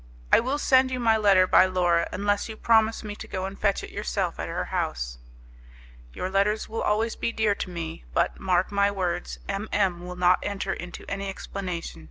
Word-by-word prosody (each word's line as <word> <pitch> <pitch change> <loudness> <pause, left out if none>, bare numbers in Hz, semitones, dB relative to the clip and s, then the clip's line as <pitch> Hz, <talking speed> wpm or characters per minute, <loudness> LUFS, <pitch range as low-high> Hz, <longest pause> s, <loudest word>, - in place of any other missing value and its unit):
I - - +9
will 260 +5 -1
send 260 -2 +4
you 255 -1 -3
my 225 -2 +4
letter 200 -4 +5
by 185 - +5
Laura, 175 -2 +1
unless 205 +3 0
you 220 - -7
promise 225 0 +3
me 210 -1 -6
to - - -8
go 185 -1 -3
and 195 +1 -6
fetch 200 -2 +1
it - - -8
yourself - - -2
at - - -3
her - - -2
house." - - -3 0.9
"Your 185 - -4
letters 200 +3 +1
will 225 +1 -4
always 220 +2 +1
be - - -2
dear 220 -2 +2
to 200 - -5
me, 165 -2 -6
but, 170 - 0
mark 185 0 +1
my 200 0 +3
words, 180 -3 -3
M 200 +2 -3
M 185 -4 +1
will 180 - -6
not 180 0 +4
enter 200 -1 -2
into 180 0 -8
any 200 0 -3
explanation. 185 -3 -5
195 Hz, 205 wpm, -26 LUFS, 180-215 Hz, 0.9 s, I